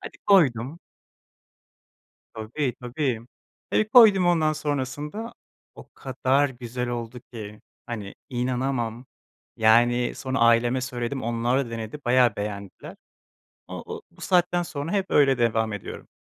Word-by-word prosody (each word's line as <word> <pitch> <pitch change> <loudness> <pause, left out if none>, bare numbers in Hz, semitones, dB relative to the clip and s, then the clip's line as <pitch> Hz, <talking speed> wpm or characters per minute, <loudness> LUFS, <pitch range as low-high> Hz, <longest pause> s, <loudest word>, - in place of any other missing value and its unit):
Hadi - - -10
koydum. 145 - +3 1.6
Tabii, 120 +4 -3
tabii, 125 -1 -2 0.5
eee, 215 - +2
koydum 215 -5 +7
ondan 155 -3 +3
sonrasında, 150 - -4 0.4
o - - -13
kadar 135 +1 0
güzel 125 0 -5
oldu 120 0 -5
ki, 105 -2 -9 0.2
hani, 105 -5 -6
inanamam, 125 -1 -2 0.5
yani, 120 +2 +3
sonra 130 -1 -3
aileme 115 +2 +3
söyledim, 125 0 -4
onlar 120 +3 0
da - - -9
denedi 115 +4 -6
bayağı 120 -3 +4
beğendiler. 100 -1 -6 0.7
O - - -7
o, - - -7
bu - - -21
saatten 175 -1 +2
sonra 165 -1 -5
hep 195 -2 0
öyle 135 -3 +4
devam 110 -2 +1
ediyorum. 105 - -8
125 Hz, 120 wpm, -25 LUFS, 115-145 Hz, 1.6 s, koydum